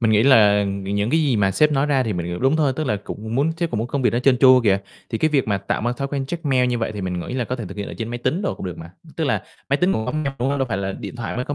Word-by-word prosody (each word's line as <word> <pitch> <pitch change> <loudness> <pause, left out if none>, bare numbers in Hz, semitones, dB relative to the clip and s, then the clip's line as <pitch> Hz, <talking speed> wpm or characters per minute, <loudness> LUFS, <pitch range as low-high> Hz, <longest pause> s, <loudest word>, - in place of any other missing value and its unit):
Mình 115 -2 +2
nghĩ 110 0 +4
là 105 -6 +5
những 100 +2 -2
cái 160 - +3
gì 140 -6 +2
mà 100 -2 +2
sếp 150 +9 +3
nói 140 0 +2
ra 140 -3 +2
thì 115 -4 -2
mình, 85 -1 -3
kiểu, 90 0 -4
đúng 135 +4 +2
thôi, 150 -4 +2
tức 155 - -1
là 105 -7 0
cũng 110 +2 -7
muốn 145 +6 +2
sếp 170 -1 -2
cũng 110 - -2
muốn 115 - -1
công 140 +1 -2
việc 125 - +3
đó 120 - 0
trơn 125 0 +3
tru 130 -1 +7
kìa. 100 -2 +4 0.3
Thì 110 - -2
cái 155 - +2
việc 135 -6 +1
mà 100 -2 +1
tạo 100 - -2
mà 120 +2 0
thói 140 +3 -4
quen 135 -1 -3
check 170 +2 -5
mail 130 -3 +2
như 120 -1 0
vậy 115 -1 -2
thì 105 - -6
mình 90 -2 -3
nghĩ 85 - -6
là 125 -2 -1
có 125 - -3
thể 120 - -5
thực 95 - -9
hiện 100 - -4
ở - - -7
trên 115 -1 -3
máy 120 +1 -4
tính 130 +10 -1
đồ 195 - -1
cũng - - -7
được 90 - -6
mà, 80 +1 -9 0.3
tức 160 - 0
là 110 -9 0 0.3
máy 140 - +3
tính 180 +4 +2
cũng 110 - -2
có - - -2
mail, 155 -1 -2
đúng 125 - 0
hông? 140 0 0
Đâu 135 - 0
phải 110 - -1
là 95 0 -2
điện 125 - -8
thoại 120 -1 -4
mới 125 - -2
có 145 - -3
120 Hz, 375 wpm, -21 LUFS, 105-140 Hz, 0.3 s, tru